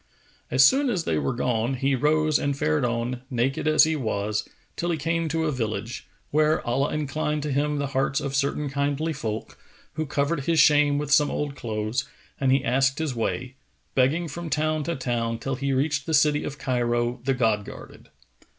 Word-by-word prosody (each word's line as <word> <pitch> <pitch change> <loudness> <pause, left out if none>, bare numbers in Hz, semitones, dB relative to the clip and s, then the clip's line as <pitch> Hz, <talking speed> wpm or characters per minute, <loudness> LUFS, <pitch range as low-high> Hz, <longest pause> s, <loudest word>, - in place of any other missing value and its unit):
As 130 +1 +6
soon 270 - +4
as 185 -8 0
they 80 - 0
were 70 - -1
gone, 120 +1 0
he 135 +2 0
rose 155 +3 +2
and 140 -1 -1
fared 75 - +1
on, 120 +1 -1
naked 130 +4 -1
as 155 -1 +6
he 160 0 +2
was, 105 -5 -2 0.3
till 175 - -2
he 165 - 0
came 165 +2 -1
to 160 +1 0
a 155 - +1
village, 115 -2 -4 0.2
where 155 +1 +2
Allah 135 +4 +1
inclined 150 0 -2
to 150 - -2
him 145 +2 0
the 140 - -1
hearts 135 +1 +1
of 135 - -4
certain 140 +2 0
kindly 140 +3 -1
folk, 110 -6 -5 0.3
who 155 0 -3
covered 145 0 -1
his 165 -1 +2
shame 145 -1 +5
with 145 0 -3
some 145 0 +5
old 145 -1 -3
clothes; 110 +2 -3 0.3
and 135 -1 +2
he 135 0 +3
asked 135 +2 +2
his 160 -4 -2
way, 125 +2 -3 0.4
begging 145 +7 +2
from 165 +2 -6
town 155 0 0
to 170 - -1
town, 120 -3 -2
till 135 +4 -3
he 140 +1 -2
reached 140 +1 0
the 160 - +2
city 150 -1 +3
of 150 - -5
Cairo 120 -2 0
the 135 0 +1
God 110 -4 +1
guarded. - - -12
140 Hz, 195 wpm, -25 LUFS, 125-150 Hz, 0.4 s, As